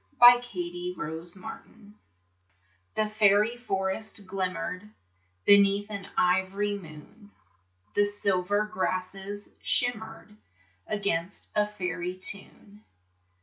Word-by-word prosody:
The 245 - +9 0.2
Faery 355 +6 -5
Forest 160 +4 -5 1.6
The 215 0 +2
faery 210 +1 +4
forest 205 -2 -3
glimmered 185 +1 -3 0.6
Beneath 200 +1 +5
an 200 -2 -5
ivory 190 +3 +2
moon, 180 +4 -12 0.6
The 205 - +4
silver 205 0 +1
grasses 195 0 -3
shimmered 220 -3 -1 0.5
Against 200 -3 -2
a 210 0 +3
faery 180 -3 -3
tune. 200 +2 -5
200 Hz, 85 wpm, -28 LUFS, 185-210 Hz, 1.6 s, The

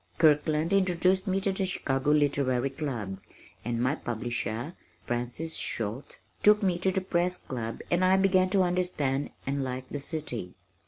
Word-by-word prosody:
Kirkland 155 +1 +3
introduced 185 0 +2
me 190 0 +1
to 195 - +1
the 190 0 -2
Chicago 135 -7 -1
Literary 140 -3 +2
Club, 120 -10 -4 0.4
and 115 +1 -2
my 130 +3 +2
publisher, 120 +2 -3 0.3
Frances 120 +7 -2
Schulte, 115 +4 -3 0.2
took 210 0 +5
me 180 -3 +1
to 190 +1 +2
the 190 - 0
Press 180 0 +1
Club 115 -8 -5
and 175 +1 +3
I 185 +1 +5
began 185 -1 +3
to 190 -1 +3
understand 175 -7 0 0.2
and 140 +1 -1
like 130 0 -4
the 145 - -4
city. 135 - -4
150 Hz, 155 wpm, -28 LUFS, 125-185 Hz, 0.4 s, took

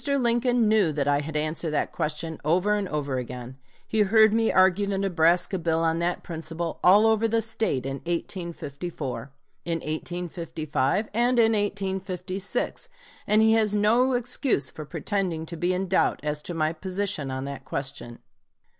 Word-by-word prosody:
Lincoln 245 -3 +2
knew 210 -6 +3
that 145 -1 -1
I 145 0 +3
had 150 +1 -3
answered 155 +2 -1
that - - 0
question 155 +1 -3
over 180 +7 +2
and 205 -2 -1
over 145 -5 -2
again. 125 +1 -7 0.3
He 220 - -2
heard 215 +1 +5
me 225 0 +2
argue 190 +2 +4
the 200 -1 -1
Nebraska 180 0 +2
bill 165 -1 0
on 165 0 +1
that 175 +1 -1
principle 165 0 -5
all 200 +5 +7
over 220 0 +3
the 225 +1 +1
State 220 - -1
in 135 0 -3
1854, 170 -5 -5 0.3
in 170 - -2
1855, 165 +1 -2
and 240 +3 +2
in 225 -1 +5
1856, 195 - -2 0.4
and 215 +1 +4
he 220 0 +5
has 215 -2 +2
no 235 +5 +3
excuse 245 - 0
for 155 - -8
pretending 175 0 -2
to 170 - -7
be 175 +2 0
in 185 +1 -1
doubt 185 - +2
as 150 0 -2
to 175 - -5
my 155 0 +1
position 185 -3 -3
on 130 0 -4
that 140 -1 -6
question. 135 -3 -5
180 Hz, 165 wpm, -26 LUFS, 155-210 Hz, 0.4 s, all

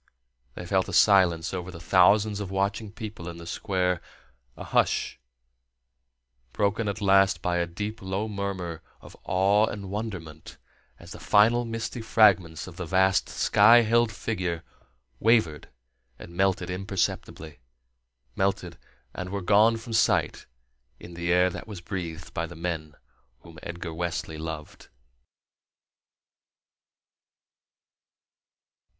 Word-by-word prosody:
They 90 - -7
felt 95 +1 0
a - - -6
silence 90 -5 +4
over 90 -1 -4
the 85 -2 -9
thousands 100 +4 +3
of 100 -2 -5
watching 100 +2 -2
people 105 -6 -8
in 85 - -9
the 85 - -10
Square, 90 0 -1 0.6
a - - -7
hush - - 0 1.3
broken 105 +2 0
at 100 - -3
last 95 -3 +3
by 90 -1 0
a 85 0 0
deep, 105 +6 -6
low 95 +3 -3
murmur 95 -5 -4 0.2
of - - -14
awe 100 +3 +3
and 100 -3 -6
wonderment 95 -8 -7 0.4
as - - -14
the - - -9
final 115 +4 +3
misty 115 +1 -5
fragments 95 -8 +3
of 85 -3 -12
the 85 - -5
vast 95 +2 +2
sky 115 +4 +5
held 115 0 +2
figure 90 -6 -3 0.6
wavered 110 -10 +2 0.5
and 85 - -12
melted 95 -1 0
imperceptibly 90 -5 -3 0.8
melted 95 -4 -2 0.3
and 90 - -6
were 100 0 -4
gone 110 +4 +4
from 115 0 -8
sight 110 - +1 0.5
in 85 - -11
the 85 0 -2
air 90 +1 +4
that - - -8
was 105 -4 -8
breathed 85 -3 -6
by 85 - -2
the 85 - -11
men 80 -3 -5 0.5
whom 80 -2 -14
Edgar 85 -1 -6
Wesley 85 -2 -4
loved. 80 -1 -7
95 Hz, 125 wpm, -26 LUFS, 85-105 Hz, 1.3 s, sky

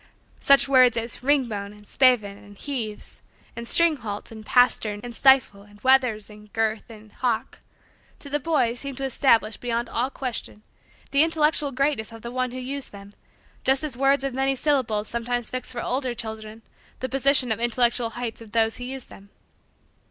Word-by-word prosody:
Such 275 0 +4
words 255 -3 +5
as 230 +1 -3
"ringbone" 235 -7 0
and 210 0 -18
"spavin" 245 -7 +3
and 205 0 -16
"heaves" 230 -7 -5 0.3
and 235 0 -7
"stringhalt" 240 -14 +1
and 220 -1 -10
"pastern" 220 -3 +2
and 240 -1 -7
"stifle" 265 -7 +4
and 205 0 -18
"wethers" 255 -5 +3
and 210 -1 -15
"girth" 225 0 -1
and 215 -1 -14
"hock," 235 -2 -2 0.6
to - - -12
the 290 +1 -1
boy, 285 -6 +1
seemed 270 +1 -6
to 275 - -5
establish, 230 -5 +2
beyond 235 0 -3
all 245 +3 -1
question, 245 -5 -6 0.5
the 280 - +5
intellectual 305 -2 +2
greatness 270 -4 -1
of 225 -1 -12
the 235 - -6
one 255 0 -1
who 250 - -8
used 265 +1 -5
them 200 0 -12 0.5
just 265 +2 +3
as 295 -5 -4
words 275 +2 +2
of 275 -2 -2
many 270 +1 0
syllables 250 -7 0
sometimes 235 0 -3
fix 255 0 -5
for 240 -2 -5
older 255 -1 -2
children 220 -1 -8 0.4
the 260 - -2
position 270 -2 +3
on 220 - -1
the - - -2
intellectual 240 0 +2
heights 235 -2 -5
of 220 -2 -13
those 225 -1 +2
who 245 - -7
use 265 0 -6
them. 200 +1 -16
245 Hz, 180 wpm, -24 LUFS, 220-270 Hz, 0.6 s, words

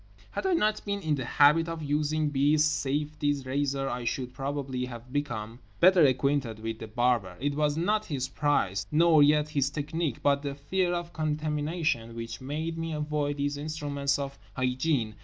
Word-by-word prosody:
Had - - -2
I 375 - +2
not 215 -8 +1
been 200 -1 -2
in 160 -6 -1
the 130 -4 -2
habit 150 +6 +4
of 165 -1 -5
using 150 +1 0
B.'s 145 +2 +3
safety 150 0 0
razor 135 +1 -1
I 125 -1 -3
should 125 +1 -3
probably 135 -1 -3
have 120 0 -10
become 120 -5 -3 0.2
better 185 0 +6
acquainted 135 -3 +2
with 110 0 -5
The 110 - -7
Barber. 110 -5 0
It 145 +2 -1
was 150 0 +1
not 210 +6 +1
his 135 -3 -2
price, 120 -9 0
nor 160 0 +5
yet 150 +1 +4
his 140 -3 +1
technique, 150 -1 -3
but 140 0 +3
the 140 -1 -4
fear 175 +6 0
of 175 -1 -3
contamination 150 -5 -1
which 115 0 -6
made 160 +5 -3
me 165 0 -3
avoid 150 -1 -1
these 145 0 -1
instruments 145 -2 -1
of 140 -1 -5 0.2
hygiene. 130 -3 0
145 Hz, 175 wpm, -28 LUFS, 130-155 Hz, 0.2 s, better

